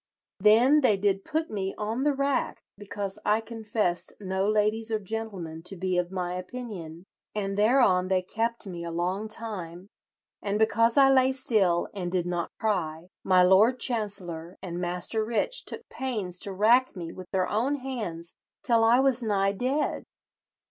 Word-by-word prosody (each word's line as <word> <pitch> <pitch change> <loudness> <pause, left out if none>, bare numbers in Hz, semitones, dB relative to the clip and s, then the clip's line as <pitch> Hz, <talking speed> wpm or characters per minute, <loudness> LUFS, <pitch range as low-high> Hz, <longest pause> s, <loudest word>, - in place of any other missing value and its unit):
Then 235 +9 +5
they 220 -7 +3
did 195 0 0
put 315 +1 -2
me 195 -2 -3
on 220 +4 -2
the 290 +1 +2
rack 275 0 -1
because 200 -1 -6
I 210 +1 +2
confessed 220 -5 -2
no 190 0 -1
ladies 215 +1 +1
or 220 - +2
gentlemen 195 -6 -6
to 195 - -6
be 185 0 0
of 175 0 -2
my 180 -2 -3
opinion, 180 -4 -7 0.3
and 195 -2 -2
thereon 210 -4 +3
they 185 -1 +1
kept 230 +4 -2
me 175 -3 -6
a 170 - -4
long 180 +5 -2
time; 195 -5 -5 0.5
and 205 0 -1
because 230 +2 +2
I 270 -1 +7
lay 260 0 +4
still, 200 -9 +2
and 180 -3 -4
did 180 -2 0
not 175 -1 -2
cry, 175 -5 -2
my 185 -1 +5
Lord 210 +7 +5
Chancellor 195 -8 -3
and 175 -1 -5
Master 180 +5 -1
Rich 235 - +1
took - - -4
pains 210 -9 -3
to 200 - -3
rack 230 +7 +3
me 170 -3 -6
with 185 -1 -10
their 185 -2 +1
own 245 +7 0
hands 215 -12 -5 0.3
till 230 -3 +4
I 235 +2 +5
was 265 -2 +2
nigh 200 -3 +1
dead. 255 +9 -1
205 Hz, 165 wpm, -27 LUFS, 180-230 Hz, 0.5 s, I